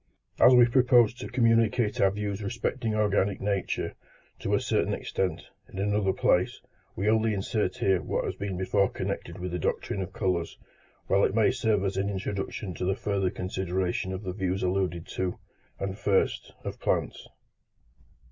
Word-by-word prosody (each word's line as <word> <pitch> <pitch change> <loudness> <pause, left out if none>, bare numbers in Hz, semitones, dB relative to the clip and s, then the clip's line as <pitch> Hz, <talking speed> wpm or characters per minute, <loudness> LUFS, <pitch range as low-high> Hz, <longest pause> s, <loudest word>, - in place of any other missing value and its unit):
As - - +8
we 120 -1 +8
propose 120 -2 +4
to 125 - -7
communicate 115 -2 +2
our 95 - +6
views 100 0 -3
respecting 115 +1 -2
organic 100 -2 +1
nature, 100 -1 -1 0.5
to - - 0
a - - +2
certain - - 0
extent, 95 -1 -2 0.3
in - - -10
another 100 0 +1
place, - - +1 0.4
we 100 +3 -1
only 110 0 +3
insert 105 +2 -1
here 95 -2 +2
what - - -2
has - - -2
been 100 -2 -4
before 95 +1 +2
connected - - -4
with 90 0 -4
the 90 - -2
doctrine 100 - -2
of 95 +1 -5
colours, 90 -4 -1 0.5
while 100 +1 +3
it - - +2
may 110 +1 +4
serve 110 -5 +1
as 95 0 -1
an 100 +1 0
introduction 100 0 -4
to 85 - -5
the 95 +1 +1
further 100 -2 0
consideration 95 0 -2
of 95 +2 -5
the 90 -2 -4
views 95 -1 -2
alluded 90 -2 0
to: 90 -1 -2 0.4
and 95 +1 -4
first, 100 -2 +1
of - - -6
plants. - - -1
100 Hz, 165 wpm, -28 LUFS, 95-110 Hz, 0.5 s, As